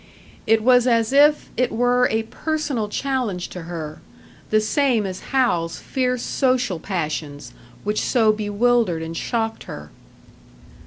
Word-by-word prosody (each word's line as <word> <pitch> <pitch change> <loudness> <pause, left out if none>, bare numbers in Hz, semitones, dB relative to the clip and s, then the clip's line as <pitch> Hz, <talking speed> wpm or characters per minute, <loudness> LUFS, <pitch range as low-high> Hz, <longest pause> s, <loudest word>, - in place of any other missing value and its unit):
It 220 0 +3
was 250 0 +5
as 230 0 +2
if 295 +2 +4
it 250 - +1
were 245 +2 +3
a 220 0 0
personal 285 -3 -3
challenge 245 -8 -2
to 180 - -7
her; 155 -3 -6 0.5
the 215 - +4
same 230 0 +1
as 185 -1 -5
Hal's 175 -11 +1
fierce 250 -2 -2
social 250 - 0
passions, 155 -5 -4 0.3
which 210 +1 -1
so 225 -4 +3
bewildered 215 -4 +1
and 165 +1 -6
shocked 225 +3 -2
her. 75 0 -9
225 Hz, 135 wpm, -22 LUFS, 185-250 Hz, 0.5 s, was